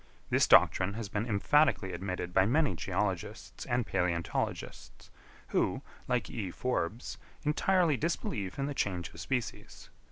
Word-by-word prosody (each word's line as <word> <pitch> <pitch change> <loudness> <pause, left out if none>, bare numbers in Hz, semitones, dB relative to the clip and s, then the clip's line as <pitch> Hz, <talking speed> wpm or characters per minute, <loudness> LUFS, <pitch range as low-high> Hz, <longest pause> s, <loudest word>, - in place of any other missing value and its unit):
This - - +4
doctrine 95 +2 +5
has 110 -3 -5
been 105 +4 -2
emphatically 110 -2 +2
admitted 90 0 -4
by 95 +1 +4
many 145 0 +2
geologists 80 - -3
and 120 -1 +1
palæontologists, 85 -1 -3 0.4
who, - - 0 0.2
like 125 -1 0
E. 105 -6 -4
Forbes, 110 0 -3 0.2
entirely 160 0 +2
disbelieve 110 - -2
in 140 - -1
the 145 - -3
change 90 -9 -2
of 80 - -11
species. 120 +8 -4
110 Hz, 130 wpm, -31 LUFS, 90-135 Hz, 0.4 s, doctrine